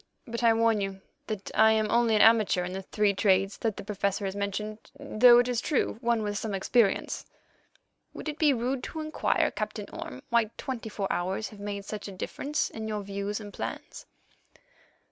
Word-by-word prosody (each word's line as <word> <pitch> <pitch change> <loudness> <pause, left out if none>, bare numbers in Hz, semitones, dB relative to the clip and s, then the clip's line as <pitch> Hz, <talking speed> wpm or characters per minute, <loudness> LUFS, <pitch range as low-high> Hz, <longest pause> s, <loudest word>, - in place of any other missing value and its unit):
But 235 0 -4
I 230 -1 +5
warn 225 -1 +3
you 195 -1 -4 0.3
that 210 -3 -5
I 220 0 +6
am 215 -1 +1
only 235 -1 +3
an 210 - +6
amateur 220 -5 +5
in 180 +1 -5
the 190 - -4
three 205 +1 +1
trades 195 0 +2
that 220 -3 -1
the - - -6
Professor 200 0 -1
has 190 0 -3
mentioned, 210 +2 -3 0.2
though, 240 +2 +6
it 245 0 +4
is 245 -1 0
true, 275 -6 0
one 235 -2 +1
with 205 0 -2
some 215 -3 -3
experience." 200 +1 +1 0.9
"Would - - -7
it 305 0 -4
be 305 -2 +5
rude 250 +1 -1
to 320 - -6
inquire, 310 0 +1
Captain - - -4
Orme, - - -7
why 235 -1 +4
twenty 240 -4 -5
four 205 -2 -3
hours 190 +4 -2
have 210 - -13
made 200 -1 -5
such 210 0 -6
a - - -7
difference 285 +10 -2
in 220 -1 -5
your 210 -1 -3
views 200 +1 -3
and 205 -2 -9
plans?" - - -6
215 Hz, 195 wpm, -28 LUFS, 200-235 Hz, 0.9 s, I